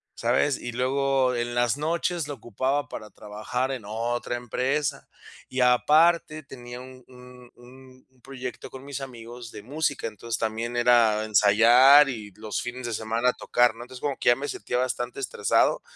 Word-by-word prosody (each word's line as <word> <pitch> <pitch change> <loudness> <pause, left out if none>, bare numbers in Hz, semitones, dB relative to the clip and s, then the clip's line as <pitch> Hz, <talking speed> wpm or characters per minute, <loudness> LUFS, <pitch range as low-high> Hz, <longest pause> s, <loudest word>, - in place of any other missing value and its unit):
¿sabes? 145 -2 +1
Y 120 - -6
luego 130 +1 +1
en 120 0 -3
las 120 +2 +1
noches 165 +1 -1
lo 145 - -5
ocupaba 130 +4 -2
para 105 - -8
trabajar 110 +5 -4
en 125 -5 -5
otra 120 +3 -3
empresa, 135 +4 -2 0.4
y 130 - -4
aparte 155 +5 +3
tenía 125 -2 -10
un 130 0 -12
un 125 -1 -15
un 130 +1 -17
un 130 -2 -31
proyecto 130 -1 -8
con 130 +1 -11
mis 140 -1 -6
amigos 120 -2 -9
de 105 -1 -10
música. 145 0 -2
Entonces, 115 +2 -5
también 115 +2 -3
era 115 -3 +4
ensayar 120 +7 +6
y 105 -5 -6
los 105 -1 -4
fines 125 +1 -6
de 120 - -3
semana 115 +3 0
tocar, 120 -2 +2
¿no? 120 - -9
Entonces, 125 0 -12
como 140 -2 -1
que - - +2
ya 120 - +6
me 140 +3 -5
sentía 125 - -3
bastante 125 0 -2
estresado, 125 -5 +1
125 Hz, 170 wpm, -25 LUFS, 120-135 Hz, 0.4 s, ensayar